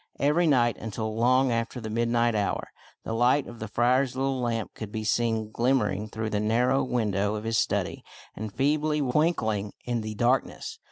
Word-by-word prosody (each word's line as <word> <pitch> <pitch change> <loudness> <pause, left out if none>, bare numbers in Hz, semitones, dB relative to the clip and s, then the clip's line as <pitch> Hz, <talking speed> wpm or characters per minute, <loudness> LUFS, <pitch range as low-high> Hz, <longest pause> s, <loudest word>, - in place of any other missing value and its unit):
Every 150 +5 +3
night, 120 -6 +3
until 110 0 -4
long 130 +3 +3
after 115 +1 -2
the 110 -2 -6
midnight 115 +1 +1
hour, 105 -2 -1 0.3
the - - -4
light 125 +5 +3
of 120 -1 -10
the 110 - -5
friar's 125 +4 +2
little 135 0 -1
lamp 115 -2 -2
could 110 -2 -7
be 110 0 -4
seen 110 -1 0
glimmering 115 -5 0
through 110 0 -4
the 105 - 0
narrow 120 +5 +2
window 105 -4 0
of 105 - -5
his 115 0 +1
study - - -1 0.3
and 110 0 -5
feebly 150 +4 +1
twinkling 125 - 0
in 120 -2 -1
the 110 0 -5
darkness. 125 +4 0
115 Hz, 175 wpm, -27 LUFS, 110-130 Hz, 0.3 s, Every